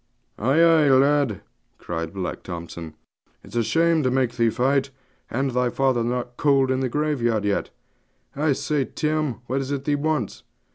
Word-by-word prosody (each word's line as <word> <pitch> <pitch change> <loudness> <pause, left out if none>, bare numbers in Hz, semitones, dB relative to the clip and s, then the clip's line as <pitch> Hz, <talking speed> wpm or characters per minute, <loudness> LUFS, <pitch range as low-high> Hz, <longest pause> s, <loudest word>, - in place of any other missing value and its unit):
'Ay, 130 +8 +2
ay, 165 -3 +5
lad,' 135 -5 +3 0.4
cried 80 -1 -4
Black 95 -1 -4
Thompson; 85 -2 -7 0.5
'it's - - -13
a 120 - +3
shame 165 +6 +2
to 130 - +1
make 130 -2 0
thee 115 -1 +3
fight, 135 +4 +1 0.4
and 135 +2 -1
thy 125 0 +1
father 130 -2 +1
not 120 +1 -3
cold 135 -2 +3
in 130 - +1
the 130 -1 -1
graveyard 120 -7 0
yet. 100 -1 0 0.7
I 145 +1 +2
say, 145 0 -1
Tim, 155 -5 -2
what 130 +3 -1
is 135 - -5
it 140 -1 -2
thee 145 - 0
wants?' 145 -6 -1
130 Hz, 170 wpm, -23 LUFS, 120-145 Hz, 0.7 s, ay